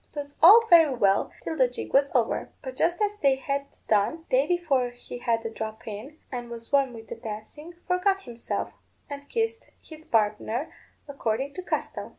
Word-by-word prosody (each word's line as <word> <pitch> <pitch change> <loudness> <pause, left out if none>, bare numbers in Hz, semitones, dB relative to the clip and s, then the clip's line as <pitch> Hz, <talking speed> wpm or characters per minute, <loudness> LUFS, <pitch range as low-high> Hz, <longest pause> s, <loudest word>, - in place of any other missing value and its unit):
'Twas 285 -1 -6
all 430 +8 +9
very 325 -7 +6
well 195 -4 +2
till 320 - -3
the 260 -4 +4
jig 245 - -7
was 275 +1 +4
over; 235 -3 +1
but 260 -2 -6
just 345 +5 +1
as 415 0 -1
they 275 -2 +4
had 275 +1 -3 0.2
done, 220 +11 +1
Davy, - - +3
for 275 -8 +1
he 245 0 -10
had 230 -2 0
a - - -1
drop 220 0 -6
in, 225 +9 -7
and 240 -2 -5
was 230 -1 -9
warm 275 -2 +3
with 225 -1 -11
the - - -6
dancing, 230 +9 -8
forgot 385 +2 +1
himself, 235 -1 -4 0.4
and 285 0 -8
kissed 455 0 -2
his 315 -1 -12
partner, 225 +3 0 0.3
according 275 0 -2
to 370 - -6
custom. - - -3
275 Hz, 180 wpm, -26 LUFS, 230-325 Hz, 0.4 s, all